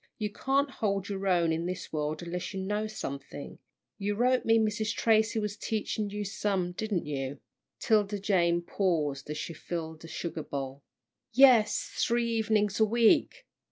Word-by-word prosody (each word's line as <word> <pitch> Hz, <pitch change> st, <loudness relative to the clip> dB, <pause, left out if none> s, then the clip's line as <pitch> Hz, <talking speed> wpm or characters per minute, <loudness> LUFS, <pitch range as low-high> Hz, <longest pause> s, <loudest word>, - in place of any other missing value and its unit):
You 210 Hz, -2 st, -2 dB
can't 275 Hz, +5 st, 0 dB
hold 200 Hz, -5 st, -1 dB
your 195 Hz, -1 st, -3 dB
own 170 Hz, -3 st, +3 dB
in 165 Hz, +2 st, -1 dB
this 185 Hz, -2 st, -5 dB
world 155 Hz, +1 st, -2 dB
unless 180 Hz, +3 st, -4 dB
you -, -, -2 dB
know 210 Hz, +3 st, -1 dB
something. 140 Hz, -8 st, -7 dB, 0.4 s
You 205 Hz, +1 st, -1 dB
wrote 250 Hz, +3 st, +2 dB
me 225 Hz, 0 st, +5 dB
Mrs. 215 Hz, -1 st, 0 dB
Tracy 220 Hz, 0 st, +3 dB
was 210 Hz, -1 st, -2 dB
teaching 210 Hz, 0 st, -2 dB
you 205 Hz, 0 st, -4 dB
some, 195 Hz, -3 st, -1 dB
didn't 200 Hz, -1 st, -2 dB
you?" 140 Hz, -1 st, -4 dB, 0.4 s
'Tilda 210 Hz, -2 st, +2 dB
Jane 175 Hz, -4 st, +2 dB
paused 155 Hz, -8 st, -1 dB
as 150 Hz, -, -3 dB
she 165 Hz, -, -4 dB
filled 160 Hz, 0 st, -6 dB
a -, -, -8 dB
sugar 165 Hz, 0 st, -4 dB
bowl. 135 Hz, -1 st, -5 dB, 0.5 s
"Yes, 250 Hz, -4 st, +6 dB, 0.2 s
three 235 Hz, 0 st, +1 dB
evenin's 210 Hz, -2 st, +1 dB
a -, -, +6 dB
week. 230 Hz, +1 st, +3 dB
200 Hz, 160 wpm, -29 LUFS, 170-215 Hz, 0.5 s, Yes